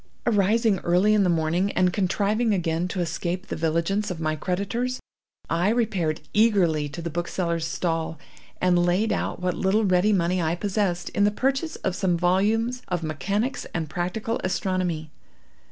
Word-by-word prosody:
Arising 215 -1 +3
early 180 +5 +3
in 210 - +4
the 185 - +3
morning, 170 +4 +1
and 180 -1 +2
contriving 210 +3 +1
again 165 -1 -1
to 185 0 -3
escape 175 +2 -3
the - - -5
vigilance 170 +6 0
of 180 -3 -4
my 155 -1 0
creditors, 200 - -2 0.5
I 170 +4 +1
repaired 195 -10 0
eagerly 180 -9 +3
to 165 +4 -7
the 170 - -3
bookseller's 170 0 -2
stall, 165 -1 -2 0.4
and 175 -1 +3
laid 180 +5 +2
out - - -2
what 180 0 0
little 200 +5 +1
ready 185 +2 +3
money 180 -2 +1
I 165 +1 0
possessed, 190 -2 -1
in 205 - +1
the 205 - +5
purchase 270 +8 -1
of 190 - 0
some 185 -4 +1
volumes 215 +8 +1
of 175 -2 -2
Mechanics 200 - -2
and 160 -3 -3
Practical 185 +7 -2
Astronomy. 180 -4 -1
185 Hz, 160 wpm, -25 LUFS, 170-210 Hz, 0.5 s, the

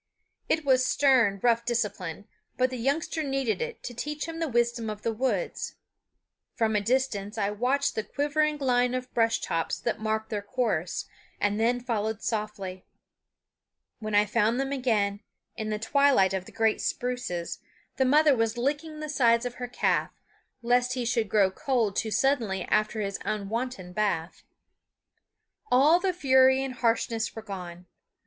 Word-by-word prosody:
It 320 -2 +1
was 260 -2 +4
stern, 255 -8 +3
rough 235 -1 +3
discipline; 210 -6 -3 0.3
but 255 0 +2
the 255 - -4
youngster 290 +6 -1
needed 270 - -1
it 475 0 -5
to 245 - -6
teach 295 +5 -4
him 330 0 -6
the 325 - 0
wisdom 240 -2 0
of 210 -1 -6
the 230 - 0
woods. 260 - -2 0.8
From 220 -2 +1
a 210 - +2
distance 225 -3 -1
I 205 -1 0
watched 255 +7 0
the 220 - -2
quivering 295 +4 0
line 250 -2 +2
of 255 0 -5
brush 225 -1 +2
tops 165 -1 -1
that 235 -2 -2
marked 220 +1 -2
their 210 -2 -1
course, 205 -6 -1 0.3
and 205 +1 0
then 240 +2 +2
followed 220 -3 -2
softly. 205 -4 -3 1.2
When 215 -1 -3
I 205 0 +5
found 225 +3 +1
them 270 0 -1
again, 215 -7 0 0.4
in 215 0 -4
the 215 - -1
twilight 225 -4 +3
of 190 -1 -2
the - - -12
great 225 -1 +1
spruces, 245 -9 -3 0.4
the 265 - +3
mother 295 +2 +5
was 225 0 0
licking 300 +5 -2
the 305 - -4
sides 235 -4 +3
of 245 - -3
her 245 - -2
calf, 245 - 0 0.5
lest 245 +1 +2
he 250 -2 -2
should 230 -3 0
grow 195 -2 +3
cold 230 -2 0
too 220 - -1
suddenly 225 -7 +1
after 215 +1 0
his 200 -1 -3
unwonted 215 -2 -3
bath. 185 -5 -1 1.3
All 295 +7 +6
the 380 0 +1
fury 265 -5 +4
and 265 -1 -4
harshness 230 -1 0
were 225 - -7
gone. 180 -4 -8
235 Hz, 160 wpm, -27 LUFS, 210-265 Hz, 1.3 s, All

